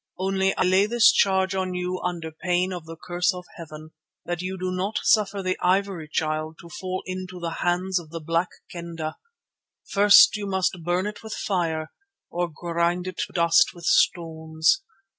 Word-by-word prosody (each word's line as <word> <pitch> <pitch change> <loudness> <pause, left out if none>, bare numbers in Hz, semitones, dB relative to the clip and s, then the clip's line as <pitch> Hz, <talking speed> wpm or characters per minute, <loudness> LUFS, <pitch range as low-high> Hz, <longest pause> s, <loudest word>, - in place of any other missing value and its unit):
Only 190 +1 0
I - - +2
lay 190 +2 +4
this 235 0 +6
charge 190 -1 +2
on 185 -1 -2
you 180 0 -3
under 170 -3 -3
pain 180 +3 -1
of 175 -3 -7
the 165 - -8
curse 175 +3 0
of 180 0 -8
Heaven, 155 -2 -10 0.3
that 175 -1 -3
you 185 +1 -4
do 185 0 -3
not 190 +4 -2
suffer 200 -2 +2
the 185 0 -1
Ivory 185 -3 +1
Child 155 0 -2
to 170 - -13
fall 185 +1 -5
into 185 -1 -6
the 170 -1 -4
hands 180 +1 +1
of 165 -3 -12
the 165 +1 -6
Black 165 +3 0 0.2
Kendah. 170 -2 -6 0.7
First 200 +1 +7
must 190 -2 0
you 180 - -10
burn 175 +3 0
it 210 0 -5
with 220 -1 -6
fire 165 -5 -2 0.4
or 175 0 -1
grind 170 +2 -1
it 185 - -6
to - - -20
dust 170 0 +4
with 170 -1 -10
stones. 160 - +2
180 Hz, 180 wpm, -24 LUFS, 170-190 Hz, 0.7 s, First